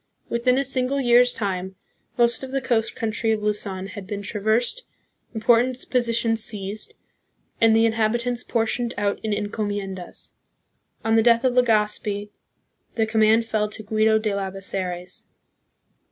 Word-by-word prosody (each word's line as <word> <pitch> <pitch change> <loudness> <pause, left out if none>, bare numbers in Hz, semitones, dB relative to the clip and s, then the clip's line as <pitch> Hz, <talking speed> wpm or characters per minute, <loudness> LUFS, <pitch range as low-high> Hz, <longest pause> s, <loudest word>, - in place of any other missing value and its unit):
Within 250 +2 +2
a 275 - +2
single 265 +1 0
year's 245 -1 +5
time 190 -3 -3 0.4
most 235 -1 +3
of 265 - -6
the 270 - 0
coast 235 -4 0
country 225 0 -1
of 210 -1 -3
Luzon 200 -3 -2
had 200 -1 -9
been 205 -1 -5
traversed, 220 - 0 0.5
import 230 +2 +4
ant 255 0 -4
positions 230 -2 +2
seized, 205 0 -3 0.7
and 225 -1 +5
the 225 0 +4
inhabitants 235 +2 0
por 230 -2 0
tioned 240 +1 -2
out 205 0 0
in 220 - -2
encomien 205 -1 -2
das. 180 -2 -9 0.7
On 225 - +2
the 225 - +5
death 235 0 +4
of 255 -1 +2
Legazpi, 210 -3 +1 0.6
the 225 - +2
command 220 +1 +3
fell 215 -2 -1
to 215 +1 -8
Guido 220 +1 +2
de 215 -1 -1
Labe 195 -1 -3
zares. 185 -2 -5
220 Hz, 155 wpm, -23 LUFS, 205-235 Hz, 0.7 s, year's